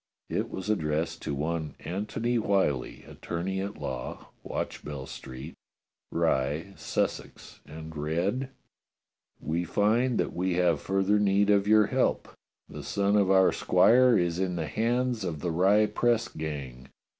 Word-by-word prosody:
It - - -1
was 95 - -6
addressed 80 -4 -1
to 70 - -3
one 80 +2 -3
Antony 105 +7 -2
Whyllie, 95 - 0
attorney 95 +3 -4
at 100 +1 -5
law, 65 -2 -6
Watchbell 70 -3 -5
Street, 65 +6 -9 0.6
Rye, 75 +8 0
Sussex, - - -3
and 80 +1 -9
read: 85 - -1 0.9
We 85 +3 -2
find 110 +8 +2
that - - -1
we 90 0 -1
have 85 -4 +2
further 95 +2 +1
need 100 0 +3
of 100 0 +3
your 110 0 +6
help. - - 0 0.4
The - - -8
son 100 0 0
of 100 -2 +3
our 95 -1 +5
squire 125 -1 +5
is 85 -1 0
in 95 -2 -1
the 80 -2 -2
hands 120 +4 0
of 80 -5 -4
the 85 - -1
Rye 100 +6 +4
press 120 +1 +1
gang. 70 -5 -6
95 Hz, 140 wpm, -28 LUFS, 80-105 Hz, 0.9 s, your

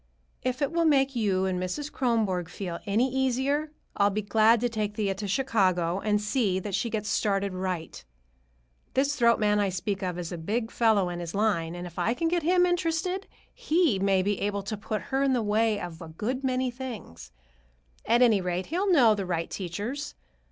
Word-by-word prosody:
If 255 +2 -1
it 280 - 0
will 335 0 +1
make 275 -3 +3
you 195 -5 +1
and 185 -1 -1
Mrs. 280 +12 -4
Kronborg 210 -9 0
feel 180 -2 -5
any 235 +6 +1
easier, 265 +4 0 0.2
I'll 200 0 +3
be 210 +1 -2
glad 220 +2 +4
to 245 - +2
take 215 -3 -3
Thea 205 -3 0
to 200 +2 -5
Chicago 190 -6 +1
and 210 0 +1
see 210 -2 0
that 195 +1 -4
she 235 - 0
gets 215 -2 -3
started 200 -2 0
right. 185 - -4 0.9
This 280 +2 +2
throat 235 -3 +4
man 210 -1 +2
I 200 -1 +2
speak 195 +2 -3
of 180 -2 -3
is 175 -2 -5
a 175 - -5
big 220 +7 -2
fellow 215 -6 +3
in 175 0 -5
his 170 +1 -6
line, 185 -6 0
and 175 0 -6
if 175 -1 -8
I 230 - +1
can 330 +5 0
get 345 0 +1
him 355 +3 +3
interested, 355 +2 -1 0.3
he 335 - +1
may 195 -1 +2
be 205 0 -1
able 200 0 -1
to 200 +2 -4
put 215 +1 -4
her 270 - +2
in 275 -1 +3
the 240 -3 +1
way 215 0 +1
of 175 -3 -7
a 165 - -7
good 230 +12 -4
many 255 -1 0
things. 215 - -8 0.8
At 235 +3 +5
any 220 -5 +4
rate, 180 0 -2
he'll 375 +5 0
know 245 -10 +6
the 200 -3 -3
right 170 -2 -2
teachers. 210 - -4
210 Hz, 200 wpm, -27 LUFS, 190-260 Hz, 0.9 s, know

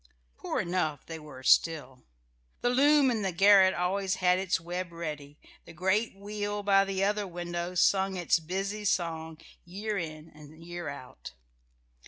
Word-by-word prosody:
Poor - - -3
enough 170 -5 -2
they 165 -1 -7
were 140 -4 -12
still. 135 -3 +2 0.6
The 245 - +2
loom 280 +1 +4
in 225 -3 -1
the 190 -2 -1
garret 195 +1 +6
always 190 +2 0
had 180 0 +2
its 190 -1 0
web 175 +1 -5
ready, 150 -4 -7 0.3
the - - -12
great 190 +6 0
wheel 205 +1 -4
by 195 -1 +4
the 195 0 -1
other 205 0 0
window 175 0 -5
sung 190 +1 +2
its 175 -1 +2
busy 195 +5 -4
song 160 -5 -1 0.3
year 200 +4 -4
in 155 -1 -7
and 155 +2 -14
year 175 -2 -6
out. 130 - -10
180 Hz, 155 wpm, -29 LUFS, 160-200 Hz, 0.6 s, garret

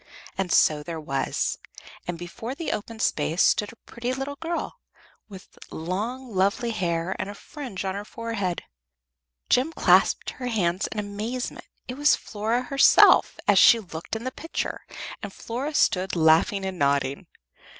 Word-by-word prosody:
And 190 -2 -2
so 150 -1 +4
there 165 +1 -6
was, 135 -3 -2 0.5
and 175 -1 -3
before 200 +9 -6
the 330 - -3
open 225 +2 -5
space 160 -3 +1
stood 210 - +2
a - - -16
pretty 245 +2 -4
little 270 +2 -4
girl, 335 +3 -4 0.5
with 190 -2 -13
long 220 +9 -4
lovely 200 +5 +1
hair 175 -3 -1
and 190 - -3
a 205 - -7
fringe 250 -7 -7
on 190 - -1
her 200 +1 -5
forehead. 210 -5 -3 0.9
Jem 265 +6 +3
clasped - - +3
her 250 - -6
hands 190 -5 0
in - - -8
amazement. 210 +5 -4 0.2
It 250 - -6
was 295 +1 +5
Flora 225 +4 -2
herself, 275 +1 +6
as - - +6
she 235 - +8
looked 170 -2 -7
in 225 - -5
the 255 - -3
picture, 325 +5 -5 0.3
and 205 - -6
Flora 260 +9 -5
stood 185 -6 +2
laughing 165 +5 +3
and 190 -2 -4
nodding. 140 -1 0
205 Hz, 155 wpm, -25 LUFS, 175-245 Hz, 0.9 s, she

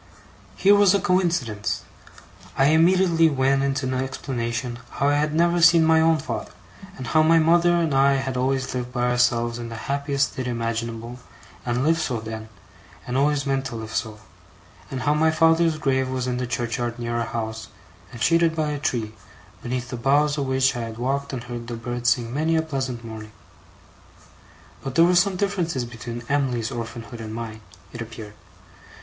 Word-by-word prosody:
Here 200 +1 +5
was 205 -1 +5
a - - +3
coincidence! 170 - 0 0.7
I 135 +1 +4
immediately 165 0 +4
went 135 -1 +2
into 140 0 -1
an 130 - -1
explanation 125 -2 -3
how 140 - +1
I 145 - +2
had 150 +1 +1
never 170 +1 +3
seen 165 -1 +6
my 160 0 +5
own 160 0 +4
father; 155 - -5 0.5
and 130 - -6
how 155 - +3
my 165 +1 +5
mother 170 +2 +4
and 165 -4 +1
I 135 +1 +4
had 135 -1 -2
always 130 +1 -1
lived 125 -1 -4
by 120 -1 -2
ourselves 120 -1 +1
in 120 -1 -6
the 115 - -7
happiest 140 +3 -1
state 130 -1 -4
imaginable, 115 0 -4 0.5
and 120 +2 0
lived 165 +2 +2
so 125 -7 -1
then, 110 0 -7 0.6
and 125 - -4
always 145 +1 +2
meant 135 -1 0
to 120 - -5
live 110 0 -7
so; 110 -1 -3 0.7
and 130 -1 -4
how 145 +2 +3
my 160 +1 +3
father's 165 0 +3
grave 130 -3 0
was 130 -1 -2
in 125 -1 -2
the 125 0 -2
churchyard 120 0 -2
near 120 0 -3
our 115 - -2
house, 110 -1 -4 0.4
and 115 -3 -5
shaded 165 -1 +3
by 155 -2 -1
a 145 - -3
tree, 115 -5 -2 0.5
beneath 125 0 -4
the 125 - -4
boughs 145 +4 +2
of 140 -2 -2
which 130 0 +2
I - - -3
had 115 -1 -6
walked 140 +3 -2
and 125 -3 -5
heard 120 -1 -7
the 120 - -4
birds 120 +1 -2
sing 120 -1 0
many 160 +3 +1
a 160 - +2
pleasant 130 -6 -4
morning. 110 -1 -9 1.5
But 135 -1 -5
there 165 - +6
were 180 - +3
some 185 +2 +3
differences 180 -9 -1
between 120 0 -7
Em'ly's 130 -4 0
orphanhood 115 -1 -7
and 110 0 -6
mine, 110 -1 -6 0.3
it 120 - -6
appeared. 110 -2 -8
130 Hz, 185 wpm, -23 LUFS, 120-155 Hz, 1.5 s, seen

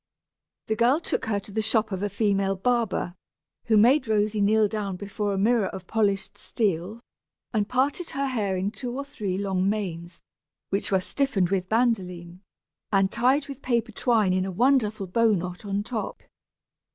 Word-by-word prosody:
The 220 - -1
girl 245 +6 +3
took 335 - -2
her 210 -2 0
to 200 - -11
the 220 +2 0
shop 220 0 +1
of 190 -1 -3
a 205 - -1
female 200 -1 +1
barber, 230 -4 0 0.5
who 220 -2 +3
made 255 +5 +5
Rosy 215 -1 +1
kneel 215 +1 +4
down 205 -2 -3
before 205 +2 -3
a 195 - -1
mirror 215 0 +3
of 190 -1 -7
polished 200 -2 0
steel, 205 +1 -2 0.5
and 210 -2 0
parted 280 +7 0
her 275 +1 -2
hair 210 -8 -1
in 190 +2 -1
two 240 +4 -5
or 280 - -4
three 210 -10 -3
long 195 -1 0
manes, 175 -5 -4 0.5
which 195 +1 -1
were 190 -1 +3
stiffened 200 -6 0
with 185 -2 0
bandoline, 185 -7 0 0.5
and 195 -1 +3
tied 270 +4 +2
with 275 -1 -8
paper 235 -2 0
twine 215 -4 +2
in 185 0 +1
a 190 - -3
wonderful 220 -1 +2
bow 225 +4 +3
knot 180 +1 -4
on 200 0 -1
top. 225 0 -5
210 Hz, 175 wpm, -26 LUFS, 195-235 Hz, 0.5 s, made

